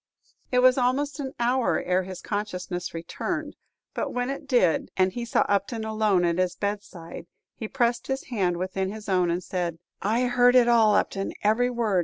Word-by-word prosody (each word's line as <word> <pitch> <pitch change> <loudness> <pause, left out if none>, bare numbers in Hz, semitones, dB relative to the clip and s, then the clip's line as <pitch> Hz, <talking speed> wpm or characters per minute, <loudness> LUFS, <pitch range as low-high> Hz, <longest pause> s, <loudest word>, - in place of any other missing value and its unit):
It 250 0 +3
was 255 +1 +6
almost 280 +4 0
an 270 -1 -4
hour 245 +1 +2
ere 180 +1 +1
his 185 -1 -8
consciousness 185 -4 -4
returned; 295 - -4 0.4
but - - -2
when 245 +1 -1
it 280 +1 -7
did, 235 - +2
and 185 0 +3
he 240 -1 -4
saw 235 - +2
Upton 205 +3 0
alone 215 -4 +2
at 170 +1 0
his 185 -1 +1
bedside, 200 -5 -5 0.3
he 220 - -6
pressed 235 +1 0
his 265 0 -2
hand 185 -8 0
within 190 +1 -2
his 215 0 -9
own, 180 -3 +2
and 175 +2 -1
said, 175 -3 -3 0.2
"I 225 +5 +1
heard 245 0 +4
it 245 -2 +6
all, 225 -3 +5
Upton, 195 -1 -1
every 225 +4 +3
word! 230 -6 +1
215 Hz, 185 wpm, -26 LUFS, 185-245 Hz, 0.4 s, was